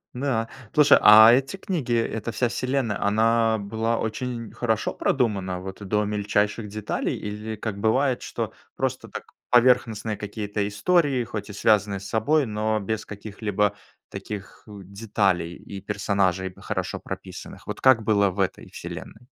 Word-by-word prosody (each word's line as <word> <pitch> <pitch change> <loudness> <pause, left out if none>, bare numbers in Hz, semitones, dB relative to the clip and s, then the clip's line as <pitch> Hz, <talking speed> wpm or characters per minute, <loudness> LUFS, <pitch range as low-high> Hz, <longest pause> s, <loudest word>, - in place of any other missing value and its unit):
Да. 125 -4 -1 0.3
Слушай, 150 -1 +6
а 110 +2 +9
эти 135 +8 +1
книги, 160 -11 -2
эта 115 0 -1
вся 120 +4 +1
вселенная, 125 -3 -1
она 110 +2 +3
была 110 +3 -1
очень 115 0 -4
хорошо 110 -2 -1
продумана, 100 -8 0
вот 95 +2 -8
до 105 +1 +1
мельчайших 105 +1 0
деталей? 105 0 -3
Или, 105 +1 -5
как 105 -1 -5
бывает, 130 +4 +2
что - - -4 0.2
просто, - - -2
так, - - -7 0.3
поверхностные 115 -3 +3
какие-то 105 0 -3
истории, 140 - +2
хоть 105 -2 -6
и - - -7
связанные 105 -1 +2
с 95 - -9
собой, 145 +7 +2
но 110 0 -1
без 110 +2 -3
каких-либо 105 0 -2 0.3
таких 100 -3 -8
деталей 100 -3 -1
и 100 -1 -9
персонажей, 95 -2 0
хорошо - - -4
прописанных? - - -9
Вот - - -6
как 130 -4 +5
было 100 -2 +3
в 95 - -8
этой 95 - -2
вселенной? 115 +3 -9
110 Hz, 140 wpm, -24 LUFS, 100-115 Hz, 0.3 s, а